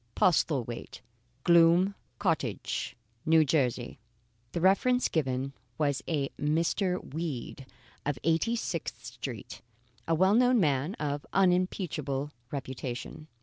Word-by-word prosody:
Postlethwaite, 135 -9 +1 0.4
Gloom 170 +3 +5 0.2
Cottage,, 160 - -1 0.4
N. 160 -1 +6
J. 125 -5 0 0.5
The - - -2
reference 225 +8 +3
given 135 -3 -1 0.2
was 145 -3 +1
a 145 -4 0
Mr. 170 +3 0
Weed 145 -4 -4 0.4
of 145 -2 -1
Eighty 165 +9 +2
sixth 175 -8 -4
Street - - -7 0.5
a 165 - +3
well 190 +4 +4
known 250 +1 +5
man 150 +2 +1
of 145 -1 -3
unimpeachable 180 -7 +1 0.2
reputation. 130 +2 -5
160 Hz, 105 wpm, -29 LUFS, 140-180 Hz, 0.5 s, N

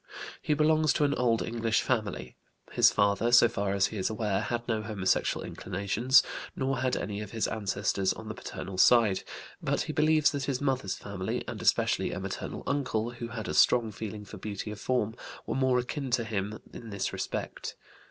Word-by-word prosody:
He 150 - +1
belongs 155 0 +3
to - - +1
an 145 -1 +2
old 115 -3 +2
English 115 -1 0
family; 105 - -2 0.4
his - - +5
father, 100 +3 +2
so 120 0 +8
far 100 -3 -2
as 100 -1 +3
he - - -4
is 95 - 0
aware, 105 -3 -1
had 120 0 -3
no 110 -2 0
homosexual 105 -3 0
inclinations, 100 +7 +2 0.3
nor 135 -1 -1
had 130 0 +1
any 105 0 -3
of 105 - -6
his 110 - 0
ancestors 100 -2 0
on 110 - -7
the 110 - -4
paternal 95 -3 -7
side; 110 -5 +5 0.4
but - - 0
he - - -3
believes 155 0 +4
that 140 -3 -2
his 135 -3 -1
mother's 130 -8 0
family, 95 -2 -4
and - - -5
especially - - +2
a - - -4
maternal - - -5
uncle 120 -5 -1
who 120 -1 -6
had 115 -2 -6
a - - -2
strong 120 -3 +4
feeling 105 0 -6
for 105 - -10
beauty 105 +2 -5
of 105 - -7
form, 120 -4 0 0.3
were - - -2
more 130 -1 +2
akin 130 +2 -3
to 120 -1 +1
him 105 -1 -3 0.2
in 115 - -9
this 100 -2 -3
respect. - - -4
110 Hz, 190 wpm, -29 LUFS, 100-125 Hz, 0.4 s, so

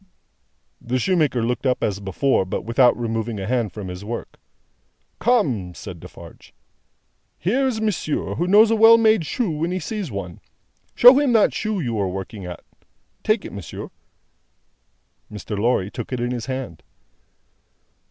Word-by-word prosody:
The 125 +2 -2
shoemaker 145 -4 +1
looked 125 +3 -1
up 125 -1 0
as 100 -2 -1
before, 100 +5 0
but 95 - -4
without 120 +2 +4
removing 115 -2 -3
a 95 - -4
hand 115 -2 -1
from 100 +1 -7
his 90 +1 -7
work. 115 +3 -7 0.8
"Come!" 130 - +1
said 90 -3 -9
Defarge. - - -14 0.8
"Here 255 - +1
is 235 -4 -2
monsieur, 210 -8 -2
who 175 - -2
knows 215 +4 +6
a - - +3
well 225 +1 +8
made 220 -7 +3
shoe 230 -8 -1
when 155 +2 -2
he 180 - -2
sees 200 +1 -4
one. 95 -5 -6 0.6
Show 250 +3 +8
him 280 -4 +2
that 220 -3 +4
shoe 215 -2 -2
you 120 -8 -2
are 100 - 0
working 95 +1 -6
at. 90 - -8 0.6
Take 215 -1 +1
it, - - -8
monsieur." 100 -6 -8 1.4
Mr. 105 0 -6
Lorry 105 -2 0
took 120 - -7
it 125 - -2
in 120 +1 -2
his 120 -1 -4
hand. 130 -11 -5
125 Hz, 160 wpm, -22 LUFS, -, 1.4 s, well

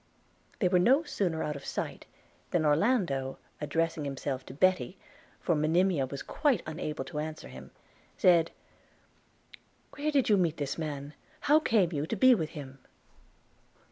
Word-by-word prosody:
They 185 - +2
were 180 0 +3
no 265 - +4
sooner 175 - -1
out 150 - -2
of 140 - -8
sight, - - -5 0.4
than 165 -3 +1
Orlando, 150 - +1 0.2
addressing 160 +1 -1
himself 135 -1 -3
to - - -8
Betty 185 +3 +2 0.4
(for 175 - +1
Monimia 160 -1 +2
was 140 +1 -6
quite 280 - +1
unable 155 -1 -4
to 150 -4 -5
answer 155 - -5
him), 65 +1 -11 0.5
said: 170 -3 +5 1.4
'Where 295 +1 -2
did 280 -4 +2
you 210 - +5
meet 170 -4 +1
this 140 -2 -2
man? 150 -4 -4
and 145 +1 -11 0.3
how 300 +2 +5
came 210 - +2
you 145 +1 -2
to 225 - -2
be 255 +5 +6
with 160 -9 -1
him?' 135 -2 -9
160 Hz, 155 wpm, -30 LUFS, 145-190 Hz, 1.4 s, be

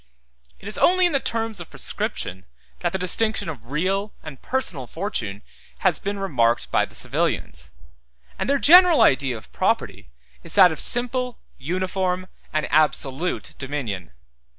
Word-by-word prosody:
It 195 - -11
is 215 - -3
only 370 +1 +4
in 350 - +2
the 275 - +1
term 225 -3 -3
of 170 - -9
prescription 95 +1 -4 0.3
that - - -1
the 190 - -2
distinction 190 +2 +3
of 125 -7 -9
real 190 +8 -2
and 150 -4 -10
personal 180 - -1
fortune 115 - -5 0.4
has - - +3
been 200 +1 -4
remarked 120 -12 0
by - - +2
the - - -16
civilians; - - -2 0.7
and - - -2
their 280 - +3
general 350 +3 +7
idea 130 -2 +2
of 110 - -15
property 65 - -1 0.3
is - - -6
that 185 -4 +7
of 160 - -6
simple, 250 0 +3 0.2
uniform, 185 +4 -2 0.3
and 155 0 -1
absolute 155 +1 0
dominion. 130 - -5
180 Hz, 150 wpm, -22 LUFS, 135-220 Hz, 0.7 s, general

